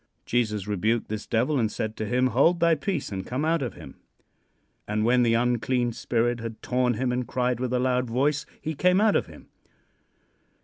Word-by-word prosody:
Jesus 105 -5 0
rebuked 110 +3 0
this 110 -1 -5
devil 130 +5 +1
and 110 -2 0
said 110 +1 -4
to 110 - -3
him: 125 +2 +2
"Hold 165 +8 +4
thy 170 -1 +4
peace, 155 - -2
and 95 -1 -4
come 130 +5 -3
out 165 0 +1
of 125 -6 -4
him." - - -12 0.9
And 105 +1 0
when 125 +1 +4
the 115 -1 +3
unclean 120 0 +1
spirit 120 +1 0
had 115 -1 -6
torn 125 -1 +1
him 125 +2 -1
and 125 0 -2
cried 125 -2 -1
with 125 -1 -2
a 125 - +1
loud 125 -1 0
voice, 140 +5 0
he 160 - -4
came 180 +5 +3
out 215 0 +3
of - - +1
him. - - -15
125 Hz, 195 wpm, -26 LUFS, 115-130 Hz, 0.9 s, Hold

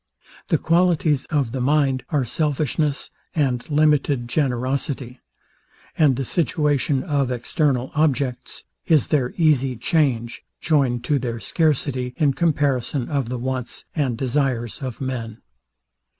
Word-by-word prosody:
The - - +2
qualities 165 -4 +2
of 140 -6 0
the 130 0 -3
mind 135 -1 +2
are 145 -5 +1
selfishness 150 +2 -1 0.2
and 130 -5 0
limited 145 -4 +2
generosity: 130 -1 -2 0.8
And 145 -5 +4
the 135 +1 -3
situation 145 -2 +1
of 145 -6 0
external 130 +1 0
objects 140 -5 -1 0.2
is 155 -5 +3
their 130 -5 +1
easy 135 -6 +3
change, 120 -2 0 0.2
joined 135 -6 +1
to 145 +2 +1
their 120 -2 -3
scarcity 130 - 0
in 150 -4 +3
comparison 140 -5 0
of 140 -6 -1
the 125 - -3
wants 125 0 -4
and 135 -7 0
desires 130 -2 -1
of 130 -2 -5
men. 115 -4 -4
135 Hz, 120 wpm, -22 LUFS, 125-150 Hz, 0.8 s, And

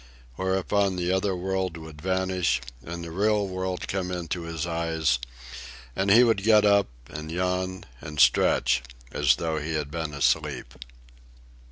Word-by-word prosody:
Whereupon 95 +3 0
the 90 0 -1
other 95 0 +1
world 95 -1 -2
would 80 -2 -11
vanish 95 -6 +1 0.2
and 85 +3 -6
the 85 - -7
real 105 +3 +1
world 95 -1 -3
come 95 -2 -2
into 90 -1 -3
his 85 -1 -3
eyes, 80 -6 0 0.8
and 95 +1 0
he 115 +5 +8
would 115 -5 +3
get 105 0 +5
up 100 -1 +4 0.2
and 75 +3 -7
yawn 90 +1 -2 0.2
and 75 0 -7
stretch 60 -1 +4 0.3
as 65 -2 +3
though 80 +1 -2
he 80 +2 -3
had 75 -2 -3
been 80 -2 -4
asleep. 65 -2 0
90 Hz, 150 wpm, -26 LUFS, 80-95 Hz, 0.8 s, he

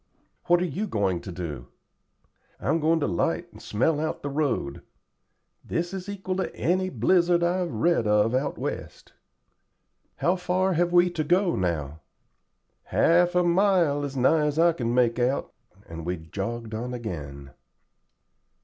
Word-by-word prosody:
"What 175 +1 +4
are - - +1
you 185 +7 -3
going 95 - 0
to 95 - -8
do?" 75 -8 -6 0.9
"I'm 145 - 0
going 160 +1 +2
to - - +1
'light 85 - -1
and - - -14
smell 145 +8 0
out 155 +1 -3
the 145 - -3
road. 140 - -1 0.8
This 175 +2 -3
is 190 0 -6
equal 190 -2 -4
to 190 - -3
any 185 +2 0
blizzard 175 -2 +2
I've 175 0 0
read 115 +1 +1
of 105 +2 +3
out 135 +3 -1
West." - - -6 1.0
"How 180 +2 +1
far 185 +1 0
have 175 +1 +1
we 175 0 +4
to 165 -3 -2
go 175 +3 +2
now?" 80 -5 -2 0.9
"Half 175 +1 +3
a 180 - +4
mile, 175 -5 +3
as 140 -1 -4
nigh 150 +4 +3
as 150 0 -2
I 170 +1 +5
can 120 -7 -2
make 120 -1 +2
out;" 125 +3 0 0.3
and 85 0 -8
we 90 +2 -2
jogged 110 +8 -5
on 125 +3 -4
again. 70 - -7
145 Hz, 155 wpm, -26 LUFS, 105-175 Hz, 1.0 s, I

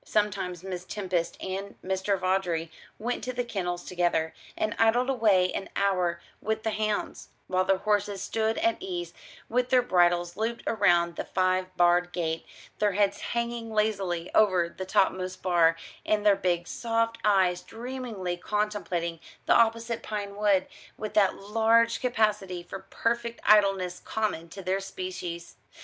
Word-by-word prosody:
Sometimes 185 -4 -1
Miss 185 -2 -5
Tempest 185 -4 -2
and 195 +1 -5
Mr. 190 +1 0
Vawdrey 180 -3 0 0.3
went 240 +3 -3
to 255 - -3
the 245 0 -1
kennels 180 -6 -3
together, 175 -3 0 0.2
and 215 - -1
idled 240 +4 +3
away 205 -7 +3
an - - -4
hour 180 -4 +1 0.2
with 220 0 -2
the 220 - 0
hounds; 215 0 -2 0.2
while 185 0 +1
their 195 0 +3
horses 205 0 0
stood 220 +2 -1
at 340 +1 +1
ease 360 -2 -5 0.3
with 250 +1 0
their 250 -1 +4
bridles 175 -3 +2
looped 225 +3 -2
round 175 -5 +2
the - - -2
five 185 0 +1
barred 175 0 +4
gate, 165 -2 -2 0.3
their 210 -2 +2
heads 200 0 +2
hanging 235 -1 -3
lazily 195 -6 0
over 185 -5 +4
the 190 - -5
topmost 185 -1 +1
bar, 170 -3 +4 0.3
and 210 -1 0
their 205 -1 +6
big 175 -3 0
soft 230 -1 -1
eyes 190 -4 +3
dreamily 230 -7 -5
contemplating 185 -4 -2 0.3
the - - +4
opposite 230 0 +2
pine 205 -2 -5
wood, 200 -2 +3 0.3
with 215 0 -5
that 200 -3 +4
large 225 +3 +2
capacity 210 -7 0
for 195 +2 -7
perfect 235 0 -1
idleness 195 -4 +4
common 210 -7 -2
to 195 +3 -9
their 185 +2 0
species. 180 -3 -6
195 Hz, 150 wpm, -28 LUFS, 180-220 Hz, 0.3 s, their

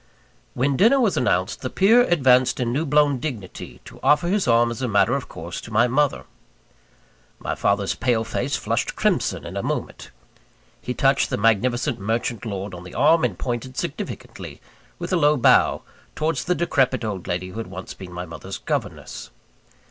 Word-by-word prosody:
When 135 +2 +1
dinner 235 +7 +5
was 225 -7 +2
announced, 95 -7 0
the 130 - -3
peer 220 - +5
advanced 130 - +3
in 120 -1 -1
new 150 +4 -1
blown 145 -1 +3
dignity, 120 -10 -7
to - - -13
offer 150 +3 +3
his 200 +1 +1
arm 120 0 +4
as 120 - -6
a 130 - 0
matter 100 +1 +3
of 140 -1 -3
course 85 +2 -7
to - - -10
my 115 +3 +4
mother. 140 +3 +1 1.1
My - - -3
father's 100 -1 0
pale 120 -3 0
face 130 +4 -2
flushed - - -2
crimson - - 0
in - - -7
a - - -1
moment. - - -4 0.7
He 125 - -4
touched 135 0 +2
the - - -1
magnificent 120 +4 +1
merchant 115 +2 -2
lord 100 -1 -5
on 90 0 -8
the 90 - -11
arm, 160 +2 +4
and 105 -8 0
pointed 125 +1 -4
significantly, - - -6 0.4
with - - -4
a - - +4
low 150 -2 +4
bow, 125 0 +4 0.3
towards 155 -2 -1
the 180 - +1
decrepit 130 -8 +1
old 100 -5 -4
lady 90 +1 -3
who 110 - -7
had 115 - -5
once 95 0 -8
been 95 -2 -10
my 90 0 -5
mother's 90 +3 -8
governess. - - -4
125 Hz, 180 wpm, -23 LUFS, 100-145 Hz, 1.1 s, dinner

